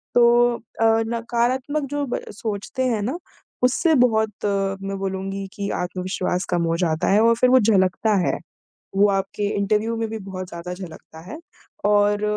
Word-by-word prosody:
तो 235 -1 +7 0.3
अ, 225 0 -4 0.2
नकारात्मक 245 +5 -1
जो 290 -1 0
ब - - -2
सोचते 215 +5 -3
हैं 225 -4 0
ना, 260 +11 -2 0.5
उससे 315 +6 +3
बहुत 220 -4 +3 0.2
मैं 195 -1 -1
बोलूँगी 195 0 -3
कि 200 -1 -4
आत्मविश्वास 180 0 -2
कम 170 -1 +1
हो - - +1
जाता 160 -3 0
है 205 - +5
और 230 0 +5
फिर 250 +2 +3
वो 260 0 +6
झलकता 205 0 +2
है। - - +1 0.6
वो 205 +1 +6
आपके 195 +1 -2
इंटरव्यू 215 +3 +1
में 225 0 -1
भी 220 - -4
बहुत 185 -1 -5
ज़्यादा 170 +1 -6
झलकता 165 -3 -10
है 310 - -6 0.5
और 205 0 +3
205 Hz, 160 wpm, -22 LUFS, 195-235 Hz, 0.6 s, तो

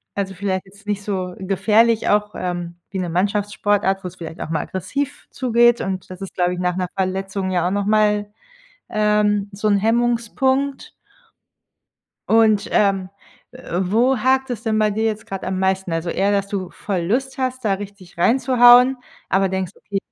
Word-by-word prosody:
Also 195 -1 -2
vielleicht 190 0 -2
jetzt 200 +2 -19
nicht 205 -1 -1
so 185 -3 -3
gefährlich 210 +4 +2
auch, 210 0 +1
ähm, 175 -1 -4
wie 190 - -4
'ne 180 -2 -2
Mannschaftssportart, 200 +1 0
wo - - -3
es 180 - -18
vielleicht 165 -2 -8
auch - - -5
mal 160 -2 0
aggressiv 275 - -4
zugeht, 240 -2 +3
und 190 -1 -4
das 185 -1 -9
ist 195 - -7
glaube 180 0 +1
ich, - - -7
nach 180 -1 0
'ner 185 -1 -1
Verletzung 190 0 -2
ja 175 -1 +1
auch - - -1
nochmal, 210 0 +1 0.6
ähm, 210 -1 +1
so 205 +2 -1
'n 205 - +4
Hemmungspunkt. 240 +5 0 1.4
Und, 220 -2 +4
ähm, 195 -2 +2 0.4
äh, 250 -8 -5
wo 230 +8 +2
hakt 260 +3 +1
es 235 -2 -4
denn 220 -2 0
bei 215 -1 +2
dir 220 +2 -1
jetzt 220 -1 -2
gerade 195 -1 -6
am 185 0 -2
meisten? 190 -2 0
Also 165 +1 -2
eher, 195 +3 +1
dass 200 0 0
du 190 -3 -3
voll 195 -3 -3
Lust 260 +9 -1
hast, 255 -1 -2
da 205 -3 +2
richtig 195 -3 -11
reinzuhauen, 250 +4 +6 0.3
aber 195 0 +3
denkst, 190 -2 -3
okay, 200 - -5
200 Hz, 175 wpm, -20 LUFS, 190-225 Hz, 1.4 s, reinzuhauen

